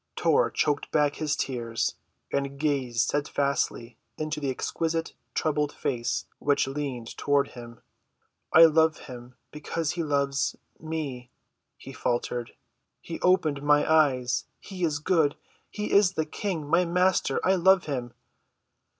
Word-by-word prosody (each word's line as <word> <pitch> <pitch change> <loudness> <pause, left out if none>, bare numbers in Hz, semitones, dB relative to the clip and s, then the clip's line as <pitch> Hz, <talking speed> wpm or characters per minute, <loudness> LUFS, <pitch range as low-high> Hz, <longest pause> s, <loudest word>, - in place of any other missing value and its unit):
Tor - - +3
choked 145 -1 0
back 145 -2 +1
his 150 -2 0
tears 115 -3 -2 0.4
and 140 0 -1
gazed 135 -6 0
steadfastly 140 -3 -1 0.2
into 155 0 -3
the 140 -2 -2
exquisite 165 +5 -2 0.2
troubled 150 -2 0
face 120 -3 -2
which 145 -1 +2
leaned 135 -4 -5
toward 145 0 +1
him. 120 -1 -11 0.7
"I 165 +1 +9
love 160 0 +3
him—because 130 +5 -6
he 175 - -3
loves—me," 140 -1 -3 0.5
he - - -11
faltered. 120 0 -2 0.5
"He 165 - -7
opened 155 -6 +2
my 145 0 +3
eyes. 130 -6 +2
He 185 -2 -7
is 155 -3 +1
good. 155 -2 +2 0.3
He 210 0 -4
is 200 -2 +5
the 160 - -1
King—my 170 -1 0
Master. 180 +2 +2
I 190 - +4
love 190 0 +4
him." 125 -5 -4
145 Hz, 125 wpm, -27 LUFS, 130-160 Hz, 0.7 s, I